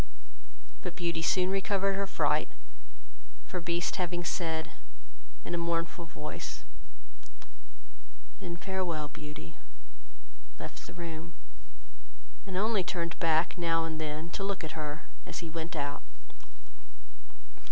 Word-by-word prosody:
But 180 - -3
Beauty 170 -2 +1
soon 185 +3 +5
recovered 195 0 +3
her 200 0 +1
fright, - - +3 1.0
for 180 - -2
Beast 170 0 +2
having 175 -1 +1
said, 160 -2 +1 0.7
in 175 - -2
a 175 - +2
mournful 170 0 +1
voice, 150 -1 -4 1.8
"then 170 -1 -3
farewell, 170 -4 0
Beauty," 150 - -7 1.0
left - - -6
the - - -9
room; 165 -1 -4 1.1
and 185 -1 -1
only 210 -1 +4
turned 170 -1 -1
back, 165 +1 +4
now 165 -1 +4
and 160 -1 -2
then, 155 +2 -2
to 195 - -1
look 195 -2 0
at 160 - -2
her 150 0 -2 0.2
as 170 - -3
he 160 - -4
went 165 +1 -2
out. 145 -1 0
170 Hz, 120 wpm, -33 LUFS, 160-180 Hz, 1.8 s, soon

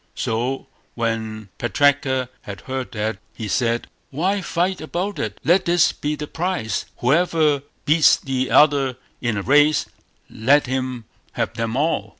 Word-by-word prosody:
So 120 +4 -2 0.3
when 110 -3 -3
Putraka 130 +2 +2
had 100 -1 -8
heard 130 -1 -5
that 105 -2 -2 0.2
he 110 - -5
said 115 +2 0 0.2
"Why 185 +8 0
fight 180 +1 -1
about 180 +6 -3
it? 105 -1 -4
Let 180 +4 +3
this 170 -1 +4
be 150 +1 -2
the 150 - -5
prize; 160 - -2
whoever 155 +1 +2 0.2
beats 155 +1 +6
the 130 -1 -2
other 140 -4 +4 0.2
in 120 -4 -1
a 100 - -2
race, 145 +4 +4 0.4
let 140 +7 +3
him 130 -2 -3 0.3
have - - -2
them 115 +1 -2
all". 155 +3 0
135 Hz, 145 wpm, -22 LUFS, 115-155 Hz, 0.4 s, beats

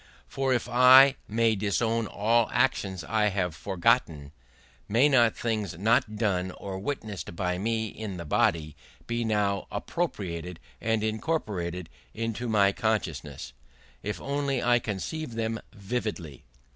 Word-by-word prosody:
For 135 -1 -1
if 120 -2 +1
I 130 +2 +7
may 115 +1 +2
disown 110 +3 0
all 115 +3 +2
actions 100 -9 0
I 110 +4 +1
have 90 -4 -1
forgotten, 80 -5 0 0.6
may 120 +7 +5
not 120 -6 +4
things 110 -6 -2
not 110 +2 +2
done 95 -4 0
or 95 -1 -6
witnessed 105 -7 -5
by 90 0 -1
me 110 +1 -1
in 100 -3 -6
the 85 - -6
body 75 0 +1 0.3
be 120 0 -2
now 105 -3 0
appropriated 90 - -3 0.2
and 110 -1 0
incorporated 105 - -2 0.3
in 115 0 -2
my 100 -3 +4
consciousness, 75 - -3 0.5
if 105 +1 -4
only 140 -2 -1
I 120 0 +4
conceive 115 +6 -4
them 115 0 -2
vividly? 100 - -5
105 Hz, 130 wpm, -27 LUFS, 95-115 Hz, 0.6 s, I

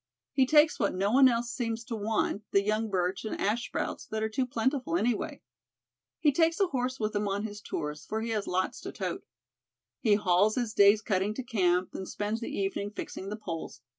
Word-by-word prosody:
He 265 -2 +3
takes 305 +2 +5
what 200 -4 +1
no 195 +2 +1
one 260 +1 +7
else 235 0 -1
seems 230 -2 -3
to 230 0 -5
want, 215 -1 0
the 200 - +3
young 215 +2 0
birch 185 -1 -1
and 220 - -4
ash 225 +4 0
sprouts - - -4
that 220 0 -2
are 220 - 0
too 255 +4 -1
plentiful 245 - 0
anyway. 245 - -1 0.8
"He 295 - +4
takes 330 +4 +2
a 395 - +5
horse 255 -2 -2
with 215 -1 -1
him 205 0 0
on 200 +1 -1
his 205 -1 -6
tours, 150 -5 -4
for 220 +1 -3
he 230 - -3
has 210 -2 -1
lots 185 +1 -1
to - - -6
tote. - - -4 0.8
He 215 -4 +4
hauls 205 +1 +3
his 240 -4 -1
day's 205 +1 +6
cutting 200 0 0
to 260 - -4
camp, 185 -7 +1
and 190 - -6
spends 210 +2 -2
the - - -4
evening 200 +1 -2
fixing 195 -2 -6
the 210 - -3
poles. 165 - -6
215 Hz, 210 wpm, -29 LUFS, 200-240 Hz, 0.8 s, one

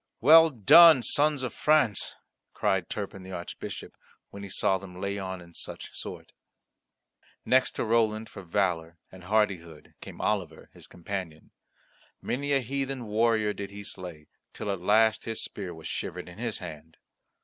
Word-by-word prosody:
"Well 160 +5 +8
done, 140 - +7
Sons 145 0 +2
of 125 - -3
France!" 150 -9 +2 0.4
cried 95 -3 0
Turpin 100 -2 -5
the 95 0 -9
Archbishop, 90 -1 -7 0.4
when 100 - -9
he 100 - -8
saw 95 0 +1
them 90 -2 -11
lay 100 +1 -3
on 95 -1 -5
in 85 -1 -15
such - - -7
sort. - - -8 1.1
Next 130 0 +3
to - - -1
Roland 110 -1 +1
for 100 - -10
valour 85 -3 -1
and 95 -1 -13
hardihood 95 -6 -1
came - - -10
Oliver, 90 -7 -2
his - - -14
companion. 90 -3 -7 0.7
Many 140 +3 -3
a 135 - +3
heathen 135 0 -3
warrior 110 0 +1
did 100 -1 -6
he 100 +1 -9
slay, 90 -6 -8 0.3
till 105 - -4
at 95 -3 -4
last 110 +3 +3
his 115 -1 -2
spear 95 -4 -5
was 80 -2 -11
shivered - - -5
in 90 +3 -12
his 115 -2 -3
hand. 80 -2 -10
100 Hz, 160 wpm, -28 LUFS, 90-115 Hz, 1.1 s, Well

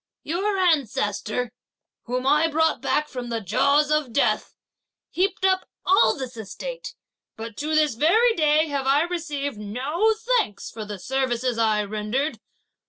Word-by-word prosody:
Your 390 +5 -1
ancestor, 250 - 0 0.5
whom 250 +1 -2
I 300 +4 +4
brought 320 -3 +1
back 300 +2 0
from 250 -4 -6
the 230 -1 -2
jaws 285 - +2
of 305 -5 +1
death, 225 -4 0 0.6
heaped 380 +1 0
up 375 -1 +1 0.2
all 360 - +4
this 260 -2 -6
estate, - - -7 0.4
but 225 +1 -5
up - - -27
to 310 +2 -1
this 305 -3 +3
very 430 - +4
day 310 -3 +3
have 280 -3 -3
I 280 +3 +4
received 300 -8 -4
no 285 - 0 0.2
thanks 205 - -2
for 220 -2 -7
the 205 -1 -6
services 250 +1 -1
I 215 -2 +2
rendered! 215 +6 -2
280 Hz, 150 wpm, -24 LUFS, 230-320 Hz, 0.6 s, I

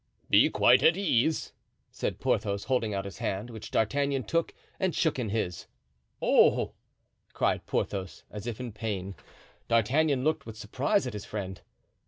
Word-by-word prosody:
"Be - - +7
quite - - +5
at 165 +2 +5
ease," 160 -5 +1 0.4
said - - -3
Porthos, 100 0 0
holding 125 -4 0
out 100 -1 -2
his 100 - -8
hand, 100 +5 -3
which 110 -2 -8
D'Artagnan 140 +4 +1
took 165 +9 0 0.3
and 185 -5 0
shook 160 -5 +1
in 115 -4 -2
his. 100 -5 -2 0.5
"Oh!" - - +4 0.6
cried - - 0
Porthos, 95 -2 -3
as 105 +2 -7
if 115 -3 -4
in 125 -2 -5
pain. 100 -3 -4 0.5
D'Artagnan 130 +5 +2
looked 155 -3 0
with 110 -1 -8
surprise 130 - 0
at 125 - -4
his 105 - -6
friend. 95 -3 -5
115 Hz, 155 wpm, -29 LUFS, 100-140 Hz, 0.6 s, Be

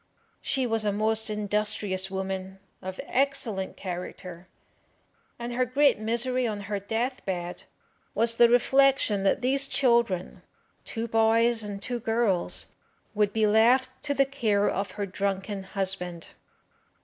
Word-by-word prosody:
She 265 -2 -1
was 225 -2 0
a 210 - +1
most 220 +2 +1
industrious 210 -2 0
woman, 190 0 -4 0.2
of 185 0 -7
excellent 250 -8 -1
character, 180 -1 -7 0.9
and 240 0 -5
her 255 +1 +1
great 275 +1 +3
misery 240 +3 0
on 210 -2 -4
her 200 0 -3
death 230 +6 -3
bed 175 -2 -5 0.5
was 230 0 +3
the 235 -1 +7
reflection 265 -3 +3
that 195 +5 +1
these 275 +2 +3
children 235 -10 +1 0.4
two 230 0 -3
boys 225 +1 +3
and 205 -2 -6
two 240 +4 -3
girls 225 -5 0 0.4
would 210 -1 +1
be 220 0 +2
left 235 +5 +4
to 285 -1 -1
the 275 - +4
care 220 -7 +1
of 200 +1 -1
her 205 -1 -3
drunken 195 +1 -3
husband. 190 -3 -4
215 Hz, 135 wpm, -27 LUFS, 195-240 Hz, 0.9 s, the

